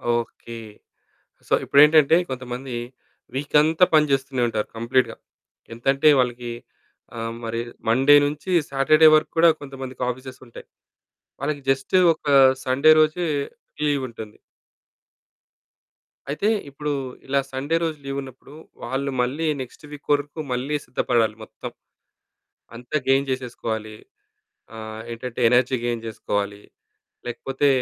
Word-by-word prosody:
Okay. 115 0 -5 0.9
So, - - -1
ఇప్పుడేంటంటే 150 +1 +6
కొంతమంది 125 0 -6 0.6
వీకంతా 150 +5 +3
పని 150 -1 +4
చేస్తూనే 135 -1 0
ఉంటారు 110 -2 -2
కంప్లీట్‌గా 120 +3 +1 0.6
ఎంతంటే 135 +6 +2
వాళ్ళకి 120 -1 -1 0.9
మరి 115 0 -3 0.3
మండే 135 +6 +5
నుంచి 150 +6 -4 0.2
సాటర్డే 150 +3 +5
వరకు 155 - +1
కూడా 165 +1 +7
కొంతమందికి 135 -2 -8
ఆఫీసెస్ 130 +1 -7
ఉంటాయి. 120 - -12 0.7
వాళ్ళకి 145 +1 -3
జస్టు 135 +6 +1 0.2
ఒక 155 - -22 0.4
సండే 140 +4 +4
రోజే 155 +3 +2 0.6
లీవుంటుంది. 130 -7 -3 1.9
అయితే 150 +8 -1 0.2
ఇప్పుడు 145 +2 -4 0.4
ఇలా 140 +1 +2
సండే 135 +5 -2
రోజు 160 -2 -2
లీవున్నప్పుడు 135 0 -7 0.3
వాళ్ళు 135 +3 -2
మళ్ళీ 135 +7 -1 0.2
నెక్స్ట్ 130 +4 -10
వీక్ 150 -1 -12
వరకు 145 +2 -2
మళ్ళీ 130 +4 -2
సిద్ధపడాలి 115 -4 0
మొత్తం. - - -9 1.0
అంతా 125 +6 -3
గెయిన్ 135 +1 +3
చేసేసుకోవాలి. 115 -4 -4 0.8
ఆహ్, 110 0 -7
ఏంటంటే 120 +1 -6
ఎనర్జీ 125 +2 +3
గెయిన్ 120 -1 -2
చేసుకోవాలి, 100 -2 -3 0.7
లేకపోతే 135 +4 -1
135 Hz, 105 wpm, -23 LUFS, 120-145 Hz, 1.9 s, కూడా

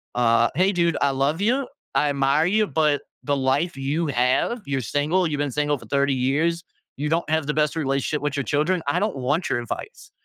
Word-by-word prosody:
uh, 115 -1 +3
"Hey, 190 +4 +3
dude, 170 -3 +1
I 140 - +3
love 140 +7 0
you, 250 +4 +1 0.3
I 150 - +3
admire 140 +3 +2
you, 215 +3 +2
but 150 -3 +1 0.2
the 145 -1 +1
life 135 +6 0
you 145 +5 -1
have 130 - +1
you're 135 -2 -1
single, 155 - 0
you've 150 -2 -2
been 145 -1 -1
single 145 +1 0
for - - -14
30 140 0 +1
years, 150 +7 0 0.3
you 150 +2 -2
don't 165 -1 0
have 160 -2 0
the 150 - 0
best 150 0 +1
relationship 140 0 -1
with 145 -1 -2
your 140 - 0
children, 155 +8 0
I 170 +5 +1
don't 210 -4 -1
want 145 +7 -1
your 120 - 0
advice, 120 - -7
145 Hz, 210 wpm, -23 LUFS, 135-165 Hz, 0.3 s, uh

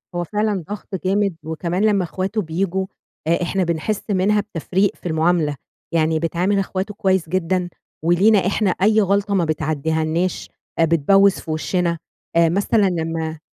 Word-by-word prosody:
هو 175 - 0
فعلًا 210 0 -1
ضغط 205 -1 -6
جامد 195 -1 +1
وكمان 170 +5 -2
لمّا 200 -3 +3
إخواته 190 +5 -2
بييجوا 190 +2 -1 0.4
آآ 170 +2 +2
إحنا 190 +2 0
بنحِس 170 +5 -2
منها 205 +2 +2
بتفريق 190 +3 -1
في - - -26
المعاملة، 160 -2 +1 0.4
يعني 160 -1 +2
بتعامل 175 +5 0
إخواته 195 +1 -3
كويّس 190 -4 0
جدًا، 180 0 0 0.3
ولينا 190 +4 +4
إحنا 205 0 +1
أي 215 +4 +3
غلطة 200 +1 +1
ما 180 -4 +2
بتعدّيهالناش 160 +3 -1 0.3
آآ 165 - +5
بتبوِّز 195 +5 +4
في 160 - -6
وِشنا 170 +2 0 0.4
آآ 170 -1 +5
مثلًا 200 +3 +2
لمّا 160 -2 -3
180 Hz, 145 wpm, -20 LUFS, 165-195 Hz, 0.4 s, آآ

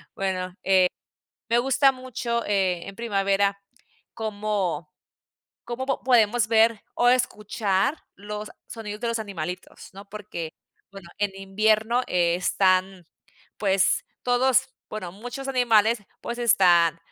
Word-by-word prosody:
bueno, 185 -2 -3
eh, 190 0 +4 0.7
me 235 +1 +4
gusta 270 +2 +4
mucho, 245 -2 -3
eh, 190 -4 +1
en 195 - -8
primavera 200 -3 0 0.5
cómo 205 -6 -2 0.7
cómo 240 +2 -4
po 270 - -1
podemos 235 -3 +3
ver 225 -1 +3
o 245 - +4
escuchar 210 -1 +1 0.2
los 210 +1 -7 0.2
sonidos 210 -2 -7
de 240 - -1
los 230 -1 -1
animalitos, 180 -4 -6
¿no? 200 +1 -12
Porque, 200 -6 -6 0.4
bueno, 195 -3 -11
en 205 -1 +1
invierno 215 +5 +1
están, 185 +1 +1 0.5
pues, 195 -2 +2 0.2
todos 250 +1 +3 0.2
bueno 185 -5 -6
muchos 245 +7 -7
animales, 235 -3 +3 0.2
pues, 235 0 -5
están 175 -8 +4
210 Hz, 115 wpm, -25 LUFS, 190-235 Hz, 0.7 s, eh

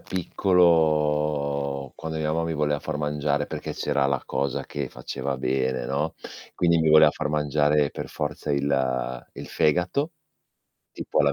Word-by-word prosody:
piccolo 75 -6 +1
quando 80 0 -5
mia 75 -1 -1
mamma 80 +1 0
mi 80 - -2
voleva 75 -1 0
far 80 -1 -4
mangiare, 75 -1 -1
perché - - -5
c'era 70 -1 0
la 70 -2 -1
cosa 70 -1 -2
che 70 -3 -4
faceva 70 +1 -4
bene, 65 -1 -1
no, 70 +5 -2 0.4
quindi 85 -1 +3
mi 80 - +2
voleva 80 0 +7
far 75 - -3
mangiare 75 0 +2
per - - -6
forza 75 0 -4
il 65 -3 -1
il - - -8
fegato, 90 - +1 0.8
tipo - - -1
alla 70 -1 +3
75 Hz, 150 wpm, -25 LUFS, 70-80 Hz, 0.8 s, voleva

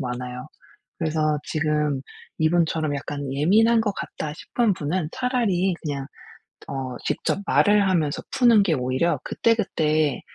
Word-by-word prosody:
많아요. 125 -1 -5 0.5
그래서 155 -1 0
지금 150 -3 0 0.4
이분처럼 160 -2 +1
'약간 145 -1 -5
예민한 215 +12 +4
것 215 -2 0
같다.' 150 -1 -5
싶은 220 +6 0
분은 155 +2 -2
차라리 230 -8 +1
그냥 140 -3 -4 0.6
어 130 -2 -4
직접 - - -1
말을 205 -2 +4
하면서 160 -6 0
푸는 235 -5 +5
게 175 -5 +1
오히려 130 +4 0
그때그때 155 - +1
155 Hz, 275 characters per minute, -24 LUFS, 145-200 Hz, 0.6 s, 푸는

